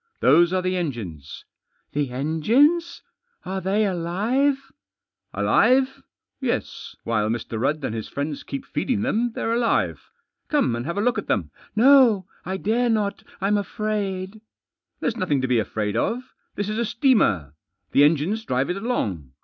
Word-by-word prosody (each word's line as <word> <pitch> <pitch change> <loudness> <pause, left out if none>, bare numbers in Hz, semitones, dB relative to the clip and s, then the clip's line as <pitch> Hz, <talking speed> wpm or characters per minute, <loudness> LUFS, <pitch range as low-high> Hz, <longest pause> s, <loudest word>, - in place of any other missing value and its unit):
" - - -46
Those 170 +2 +5
are 185 -1 0
the 185 0 0
engines." 105 - -5 0.2
" - - -46
The 145 -2 0
engines? 230 - +2 0.4
Are 190 +1 -3
they 200 +4 +1
alive? 215 +11 0 0.2
" - - -66
" - - -59
Alive? 260 +1 +3 0.4
Yes, - - -3
while 110 -2 0
Mr. 115 -1 -3
Rudd 145 +3 0
and - - -3
his 110 -1 -4
friends 145 +1 -4
keep 275 -1 -6
feeding 240 -7 -1
them 240 -1 0
they're 225 - -1
alive. 235 -1 0 0.4
Come 285 - +1
and 120 +4 -4
have 170 - -3
a - - +1
look 245 +3 +1
at - - -8
them." - - -1
" - - -28
No, 240 -5 +6 0.2
I 190 +1 -3
dare 235 +5 +1
not 210 -3 0 0.2
I'm 205 +2 +2
afraid." 205 -1 -3 0.3
" - - -59
There's 235 -2 -1
nothing 160 -10 +1
to 130 - 0
be 125 -2 +3
afraid 105 -1 -2
of. 250 +2 -2 0.2
This 205 - -2
is 215 +2 -2
a 235 - +1
steamer. 210 - +2 0.4
The 140 - +5
engines 165 +9 +2
drive 135 - 0
it 180 - -3
along. 100 - -3
190 Hz, 175 wpm, -23 LUFS, 140-235 Hz, 0.4 s, No